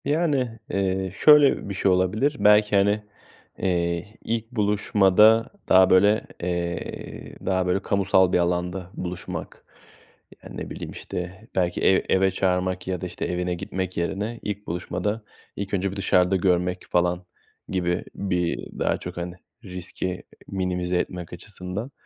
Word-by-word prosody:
Yani, 145 -7 0
eee, 95 -1 -1
şöyle 150 -6 +6
bir - - -3
şey 95 0 +2
olabilir: 100 +11 +2
Belki, 105 0 +5
hani, 100 +2 +3 0.5
eee, 85 +1 -1
ilk 115 0 -3
buluşmada 105 0 +4 0.2
daha 95 0 +7
böyle, 105 +4 +4 0.2
eee, 85 -1 -4
daha 95 -1 +1
böyle 90 +2 +1
kamusal 95 -2 +3
bir - - +5
alanda 90 +1 -1
buluşmak. 90 -1 -6 0.8
Yani, - - -9
ne - - -5
bileyim, - - -6
işte 90 +4 -7
belki 90 -1 0
ev 95 - +4
eve 95 0 +3
çağırmak 90 -1 0
ya 90 -2 -2
da - - -3
işte 90 -1 -4
evine 90 0 -1
gitmek 95 +1 -4
yerine, 105 +7 -2
ilk 105 0 -5
buluşmada 105 +5 -3 0.3
ilk 100 0 -5
önce 100 0 0
bir - - -7
dışarıda 90 -1 +3
görmek 90 -1 +1
falan 90 0 +1 0.4
gibi, 90 -1 0
bir 90 -3 -1 0.2
daha - - +1
çok, - - -8
hani, 85 0 -4 0.3
riski 90 -1 -5 0.2
minimize 90 -2 -1
etmek 90 -1 -4
açısından. 95 +6 -6
95 Hz, 140 wpm, -24 LUFS, 90-105 Hz, 0.8 s, daha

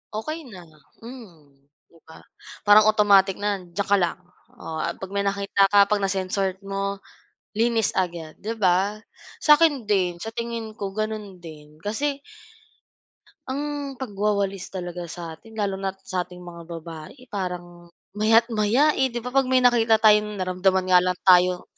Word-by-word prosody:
Okey 310 +7 -5
na, 190 -7 -11 0.4
hmm, 175 - -13 0.3
'di 165 - -21
ba? 160 - -14 0.4
Parang 210 +1 +6
automatic 200 -3 +4
na, 205 -1 -2
"Diyan 180 +2 -5
ka 200 - +6
lang." 175 0 -1 0.4
Oh, 160 -9 -7
ah 170 - -2
'pag 190 0 -9
may 200 - -1
nakita 200 0 +2
ka, 200 0 +6
'pag 205 +1 0
na-sense 195 0 -2 0.2
mo 195 0 -4 0.6
linis 230 -2 +2
agad 170 -4 -3
'di 220 +3 -4
ba? 195 0 +2 0.5
Sa 300 -1 +7
akin 305 -6 +3
din, 190 -4 0
sa 225 - -4
tingin 230 -1 -5
ko 195 -1 -5
gano'n 215 -2 -4
din 150 -2 -12
kasi. 275 +7 -2 1.3
Ang 285 0 -4
pagwawalis 200 -5 -2
talaga 175 -2 -6
sa 170 0 -7
atin 220 +8 -14
lalo 200 -3 -2
na't 195 0 -5
sa 180 -2 -3
ating 180 0 -12
mga 170 -1 -11
babae 165 0 -9 0.2
parang 175 -3 -6 0.2
maya't 225 +3 +3
maya 230 +8 +3
eh. 265 -3 +1
'Di 240 -2 -6
ba, 250 - -5
'pag 270 -1 +2
may 255 -1 +3
nakita 230 -2 +4
tayong 210 -1 +4
naramdaman 185 0 +1
nga 180 - +8
lang 180 0 0
tayong 180 -1 +5
200 Hz, 160 wpm, -24 LUFS, 180-225 Hz, 1.3 s, nga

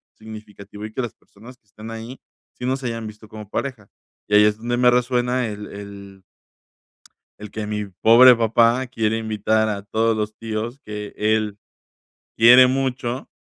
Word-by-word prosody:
significativo 105 -1 -11
y 110 - -9
que 130 - -2
las 115 -2 -5
personas 120 +5 -17
que 110 - -52
están 110 +2 -11
ahí 115 +3 -8 0.3
sí 125 - -8
nos 130 +1 -2
hayan 115 -2 -4
visto 105 0 -12
como 105 -2 -10
pareja. 125 -7 -5 0.4
Y 105 - +1
ahí 105 - +7
es 105 0 +1
donde 120 +2 -3
me 125 0 +4
resuena 125 0 0
el 105 -1 -7
el 100 -1 -11 1.2
el 105 -1 -10
que 110 -1 -5
mi 105 -1 -3
pobre 115 +6 +6
papá 115 +3 +2
quiere 110 -3 -1
invitar 110 0 0
a 100 -1 -3
todos 110 +2 0
los 105 0 -3
tíos 115 +4 -5
que 105 -1 -7
él 105 -1 0 0.8
quiere 125 +3 +8
mucho, 130 -1 -3
110 Hz, 165 wpm, -21 LUFS, 105-120 Hz, 1.2 s, quiere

